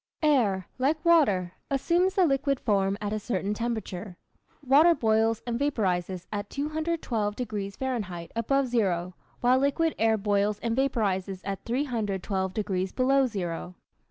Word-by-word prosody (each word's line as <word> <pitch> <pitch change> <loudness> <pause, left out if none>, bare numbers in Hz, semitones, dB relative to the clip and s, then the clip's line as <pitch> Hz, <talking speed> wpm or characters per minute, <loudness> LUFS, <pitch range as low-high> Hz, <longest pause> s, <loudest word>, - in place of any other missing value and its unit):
Air, 220 -11 +3
like 300 +5 0
water, 205 - +4 0.2
assumes 345 +7 +1
the 375 - +5
liquid 275 -2 +1
form 200 -3 +1
at 210 0 -3
a 215 - -1
certain 205 -2 -2
temperature. 210 -5 -4 0.5
Water 305 +6 +6
boils 220 -1 +1
and 235 -1 -2
vaporizes 190 -10 -1
at 205 0 -4
212 295 -8 -2
degrees 205 -5 -4
Fahrenheit 205 -10 -4
above 275 +4 +1
zero, 185 -8 0 0.3
while 250 +1 +4
liquid 295 +4 +1
air 225 0 +3
boils 205 0 +1
and 230 0 -1
vaporizes 200 -8 0
at 195 -1 -4
312 210 -7 -1
degrees 190 -2 -2
below 265 +1 +3
zero. 180 -4 -4
220 Hz, 135 wpm, -27 LUFS, 195-270 Hz, 0.5 s, Water